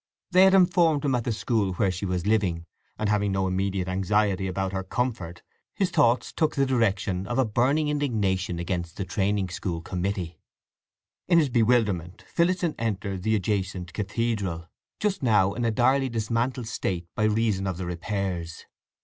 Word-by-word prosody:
They 185 Hz, +1 st, +7 dB
had 190 Hz, 0 st, +5 dB
informed 175 Hz, -5 st, +4 dB
him 135 Hz, -, +2 dB
at 120 Hz, -2 st, 0 dB
the 120 Hz, -, 0 dB
school 110 Hz, -3 st, 0 dB
where 95 Hz, +1 st, +1 dB
she 95 Hz, +2 st, -4 dB
was 90 Hz, -1 st, -2 dB
living, 95 Hz, -6 st, +1 dB, 0.3 s
and 110 Hz, -, -1 dB
having 105 Hz, -1 st, +1 dB
no 95 Hz, 0 st, 0 dB
immediate 95 Hz, 0 st, -1 dB
anxiety 95 Hz, +1 st, +1 dB
about 95 Hz, 0 st, -2 dB
her 95 Hz, 0 st, -2 dB
comfort, 95 Hz, -7 st, -3 dB, 0.3 s
his 190 Hz, -3 st, 0 dB
thoughts 125 Hz, -6 st, +2 dB
took 155 Hz, -, 0 dB
the 140 Hz, -, +2 dB
direction 100 Hz, -7 st, 0 dB
of 120 Hz, -, -2 dB
a 130 Hz, -, +3 dB
burning 130 Hz, +8 st, +1 dB
indignation 105 Hz, -12 st, 0 dB
against 85 Hz, -1 st, -3 dB
the 95 Hz, -, -3 dB
training 95 Hz, +1 st, 0 dB
school 85 Hz, -1 st, -3 dB
committee. 90 Hz, 0 st, -3 dB, 0.9 s
In 175 Hz, -, +4 dB
his 155 Hz, -4 st, +4 dB
bewilderment 110 Hz, -7 st, +1 dB
Phillotson 175 Hz, -1 st, +1 dB
entered 100 Hz, -4 st, -2 dB
the 110 Hz, +3 st, +1 dB
adjacent 95 Hz, -3 st, -2 dB
cathedral, 100 Hz, -5 st, -2 dB, 0.3 s
just 205 Hz, -2 st, -1 dB
now 105 Hz, -6 st, +3 dB
in 120 Hz, -, -3 dB
a -, -, +3 dB
direly 130 Hz, +4 st, +2 dB
dismantled 115 Hz, +2 st, -1 dB
state 90 Hz, -6 st, -3 dB
by 110 Hz, -, 0 dB
reason 105 Hz, -3 st, +1 dB
of 95 Hz, -3 st, -3 dB
the 90 Hz, -, -4 dB
repairs. 90 Hz, -1 st, -4 dB
105 Hz, 165 wpm, -26 LUFS, 95-120 Hz, 0.9 s, They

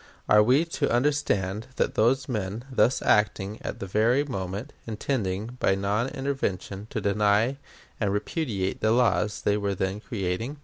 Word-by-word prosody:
Are 105 Hz, -, +6 dB
we 130 Hz, +9 st, +4 dB
to 165 Hz, -, -1 dB
understand 115 Hz, -6 st, 0 dB
that -, -, 0 dB
those 130 Hz, +4 st, +2 dB
men, 105 Hz, -1 st, -3 dB
thus 125 Hz, 0 st, +2 dB
acting 105 Hz, 0 st, +2 dB
at -, -, -5 dB
the -, -, -4 dB
very 115 Hz, +8 st, +2 dB
moment, 100 Hz, 0 st, -5 dB
intended 110 Hz, 0 st, -2 dB
by 95 Hz, -, +3 dB
non 100 Hz, +6 st, 0 dB
intervention 130 Hz, -8 st, -3 dB
to -, -, -3 dB
deny 105 Hz, +5 st, +2 dB, 0.4 s
and 105 Hz, -3 st, +1 dB
repudiate 105 Hz, -, -2 dB
the 110 Hz, 0 st, +3 dB
laws 115 Hz, -3 st, +2 dB
they 105 Hz, 0 st, +2 dB
were 100 Hz, -1 st, -1 dB
then 95 Hz, +2 st, -2 dB
creating? 110 Hz, +5 st, -3 dB
105 Hz, 150 wpm, -26 LUFS, 100-125 Hz, 0.4 s, Are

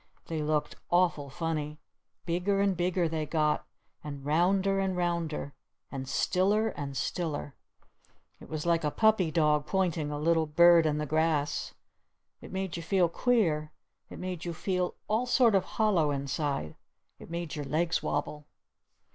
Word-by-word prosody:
They 160 Hz, -2 st, -3 dB
looked 150 Hz, 0 st, -1 dB
awful 170 Hz, -5 st, +2 dB
funny. 150 Hz, 0 st, -3 dB, 0.5 s
Bigger 180 Hz, +4 st, 0 dB
and 200 Hz, -1 st, +2 dB
bigger 175 Hz, 0 st, +1 dB
they 160 Hz, -1 st, -3 dB
got! 150 Hz, -1 st, 0 dB, 0.4 s
And 140 Hz, -2 st, -7 dB
rounder 190 Hz, +6 st, +2 dB
and 190 Hz, -1 st, -1 dB
rounder! 170 Hz, -5 st, -2 dB, 0.4 s
And 135 Hz, -1 st, -5 dB
stiller 205 Hz, +4 st, +2 dB
and 140 Hz, -7 st, -5 dB
stiller! 150 Hz, -2 st, -3 dB, 0.9 s
It -, -, -13 dB
was 155 Hz, 0 st, -4 dB
like 170 Hz, -1 st, +2 dB
a 150 Hz, -, +2 dB
puppy 220 Hz, -1 st, +3 dB
dog 150 Hz, -2 st, +2 dB
pointing 175 Hz, -6 st, 0 dB
a 150 Hz, -, -3 dB
little 160 Hz, +1 st, +2 dB
bird 170 Hz, +1 st, +6 dB
in 150 Hz, -1 st, 0 dB
the 150 Hz, -, -1 dB
grass. 155 Hz, -1 st, 0 dB, 0.7 s
It -, -, -11 dB
made 190 Hz, -2 st, -3 dB
you -, -, -5 dB
feel 175 Hz, 0 st, +2 dB
queer. 170 Hz, -9 st, +1 dB, 0.4 s
It -, -, -9 dB
made 180 Hz, -2 st, -5 dB
you 170 Hz, -1 st, -4 dB
feel 180 Hz, +1 st, -1 dB
all 225 Hz, +4 st, 0 dB
sort 245 Hz, -3 st, +4 dB
of 195 Hz, -2 st, +3 dB
hollow 195 Hz, -9 st, +3 dB
inside. 140 Hz, -, -2 dB, 0.4 s
It -, -, -12 dB
made 170 Hz, -2 st, -4 dB
your 145 Hz, -2 st, -4 dB
legs 165 Hz, +5 st, 0 dB
wobble. 150 Hz, -1 st, -3 dB
165 Hz, 155 wpm, -29 LUFS, 150-185 Hz, 0.9 s, bird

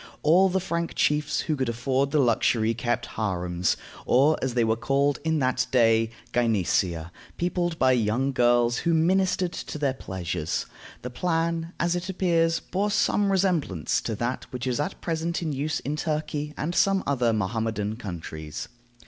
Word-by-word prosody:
All 180 Hz, +5 st, +5 dB
the 190 Hz, +1 st, +1 dB
Frank 170 Hz, -2 st, -3 dB
chiefs 150 Hz, 0 st, +1 dB
who 155 Hz, -, -1 dB
could 130 Hz, -4 st, -1 dB
afford 130 Hz, +4 st, 0 dB
the 150 Hz, -, +1 dB
luxury 115 Hz, -3 st, +2 dB
kept 120 Hz, 0 st, -1 dB
harems, 90 Hz, -4 st, -1 dB, 0.3 s
or, 140 Hz, +5 st, +5 dB
as 130 Hz, -2 st, -2 dB
they 120 Hz, -, +3 dB
were 110 Hz, 0 st, +2 dB
called 140 Hz, +4 st, +1 dB
in 160 Hz, 0 st, +1 dB
that 130 Hz, -3 st, +1 dB
day, 115 Hz, -2 st, +3 dB, 0.2 s
gynecea, 95 Hz, -7 st, +1 dB, 0.3 s
peopled 175 Hz, -1 st, -1 dB
by 130 Hz, -3 st, +4 dB
young 125 Hz, +3 st, +1 dB
girls 120 Hz, -1 st, +3 dB
who 170 Hz, -1 st, +1 dB
ministered 185 Hz, +2 st, +2 dB
to -, -, -6 dB
their 140 Hz, -3 st, 0 dB
pleasures. 90 Hz, -, -3 dB, 0.4 s
The 125 Hz, -, -5 dB
plan, 165 Hz, +3 st, -1 dB
as 170 Hz, 0 st, +1 dB
it 175 Hz, +2 st, -4 dB
appears, 170 Hz, -3 st, +2 dB
bore 200 Hz, +3 st, -2 dB
some 205 Hz, -1 st, +2 dB
resemblance 175 Hz, -, +1 dB
to 110 Hz, -, -3 dB
that 120 Hz, +4 st, -3 dB
which 125 Hz, 0 st, -5 dB
is 125 Hz, +1 st, -1 dB
at 150 Hz, +6 st, -3 dB
present 165 Hz, +1 st, -2 dB
in 155 Hz, -3 st, -2 dB
use 145 Hz, +2 st, -1 dB
in 145 Hz, +3 st, -3 dB
Turkey 150 Hz, -1 st, -3 dB
and 165 Hz, +3 st, -2 dB
some 195 Hz, +1 st, +3 dB
other 125 Hz, -4 st, +1 dB
Mohammedan 110 Hz, 0 st, -1 dB
countries. 80 Hz, -7 st, -7 dB
135 Hz, 165 wpm, -26 LUFS, 115-165 Hz, 0.4 s, All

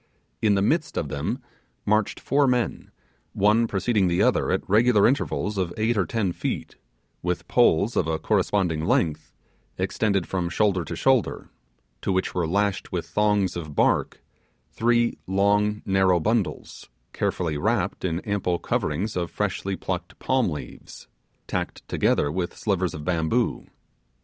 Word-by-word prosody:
In 105 Hz, -2 st, +3 dB
the 100 Hz, -, +2 dB
midst 155 Hz, +9 st, 0 dB
of 75 Hz, -, -1 dB
them 70 Hz, 0 st, -3 dB, 0.4 s
marched 110 Hz, 0 st, +1 dB
four 140 Hz, 0 st, +2 dB
men, 125 Hz, -2 st, -1 dB, 0.4 s
one 105 Hz, +3 st, +3 dB
preceding 100 Hz, -1 st, +1 dB
the 85 Hz, 0 st, +1 dB
other -, -, +2 dB
at -, -, -1 dB
regular 110 Hz, +1 st, +4 dB
intervals 105 Hz, -6 st, -1 dB
of 90 Hz, -2 st, -1 dB
eight 110 Hz, +2 st, +1 dB
or 95 Hz, -5 st, +1 dB
ten 105 Hz, -3 st, 0 dB
feet, -, -, -4 dB, 0.5 s
with 90 Hz, 0 st, -2 dB
poles 120 Hz, -1 st, +3 dB
of 80 Hz, -, +1 dB
a 80 Hz, 0 st, 0 dB
corresponding 85 Hz, -3 st, 0 dB
length, 80 Hz, -2 st, 0 dB, 0.5 s
extending 100 Hz, -4 st, 0 dB
from 90 Hz, -1 st, -2 dB
shoulder 95 Hz, -1 st, +1 dB
to 85 Hz, -, -5 dB
shoulder, 130 Hz, +3 st, +1 dB, 0.5 s
to -, -, -1 dB
which 95 Hz, 0 st, 0 dB
were 90 Hz, -3 st, 0 dB
lashed 100 Hz, +3 st, 0 dB
with -, -, -2 dB
thongs 105 Hz, -3 st, +1 dB
of 75 Hz, -4 st, -6 dB
bark -, -, +1 dB, 0.5 s
three 120 Hz, 0 st, +1 dB
long 105 Hz, +2 st, +2 dB
narrow 95 Hz, -2 st, +3 dB
bundles, 110 Hz, +3 st, -2 dB, 0.2 s
carefully 80 Hz, -4 st, -1 dB
wrapped -, -, 0 dB
in 85 Hz, -1 st, -1 dB
ample 100 Hz, -4 st, -1 dB
coverings 90 Hz, +6 st, -2 dB
of 85 Hz, -1 st, -2 dB
freshly 100 Hz, -1 st, -2 dB
plucked 90 Hz, -1 st, -5 dB
palm 130 Hz, -5 st, +1 dB
leaves, 75 Hz, -3 st, -9 dB, 0.4 s
tacked -, -, -4 dB
together 75 Hz, -, +1 dB
with 90 Hz, +1 st, -3 dB
slivers 95 Hz, -4 st, -1 dB
of 75 Hz, -1 st, -7 dB
bamboo. 90 Hz, +7 st, 0 dB
95 Hz, 145 wpm, -25 LUFS, 85-110 Hz, 0.5 s, regular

